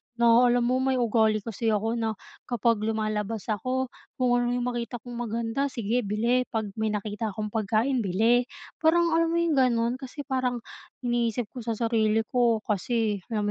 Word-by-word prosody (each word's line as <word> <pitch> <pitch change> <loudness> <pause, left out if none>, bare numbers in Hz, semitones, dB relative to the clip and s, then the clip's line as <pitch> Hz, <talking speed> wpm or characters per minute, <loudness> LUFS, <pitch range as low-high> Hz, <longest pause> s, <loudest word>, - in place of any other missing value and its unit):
na 235 +1 +5
alam 245 0 +3
mo, 255 +2 +2
may 265 0 +1
ugali 220 -3 +2
kasi 230 +1 -3
ako 220 +1 +1
na 220 -1 -1 0.3
kapag 235 -2 +1
lumalabas 215 0 -2
ako, 255 +5 -1 0.2
kung 250 -1 +1
ano 245 - 0
'yong 245 - -1
makita 240 0 -3
kong 245 - -9 0.2
maganda, 230 +5 -1
sige 235 -1 -1
bili. 235 +5 +1
'Pag 220 -3 -3
may 220 - +1
nakita 210 0 -3
akong 210 -1 -4
pagkain, 225 +4 +1
bili. 225 +5 +2 0.3
Parang 335 +1 +3
alam 330 0 +3
mo 330 - -1
'yong 335 -4 +2
gano'n? 245 0 +2
Kasi 275 +2 -7
parang 255 -3 -1 0.4
iniisip 240 -2 0
ko 255 - -8
sa 230 -1 -3
sarili 225 -1 +1
ko 235 -3 +2
kasi, 215 0 0
alam 215 -2 -1
235 Hz, 175 wpm, -27 LUFS, 220-250 Hz, 0.4 s, na